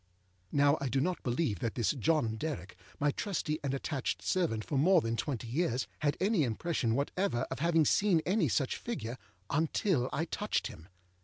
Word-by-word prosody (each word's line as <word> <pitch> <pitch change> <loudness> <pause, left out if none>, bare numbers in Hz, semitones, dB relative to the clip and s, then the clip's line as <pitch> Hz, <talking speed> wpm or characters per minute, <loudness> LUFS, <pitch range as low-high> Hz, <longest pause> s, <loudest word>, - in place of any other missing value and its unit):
â - - -41 0.5
Now 145 +1 +5
I 135 - -1
do 135 - +1
not 180 +6 0
believe 120 - 0
that 115 +2 -2
this 120 - +2
John 145 -4 +1
Derrick, 110 - -4 0.2
my 145 0 +3
trusty 155 -3 -2
and 140 - 0
attached 135 0 -2
servant 155 - 0
for 150 - -3
more 175 +7 +5
than 115 -6 -1
twenty 125 -1 -3
years, 130 -1 0
had 145 -1 +1
any 195 -2 +2
impression 120 -1 0
whatever 140 0 0
of 130 - -3
having 165 0 +3
seen 195 +2 +4
any 185 -2 +2
such 130 +2 0
figure, 130 - -5 0.3
until 155 -2 +1
I 160 - -1
touched 210 +4 -1
him. 80 -3 -8
145 Hz, 180 wpm, -32 LUFS, 120-170 Hz, 0.5 s, Now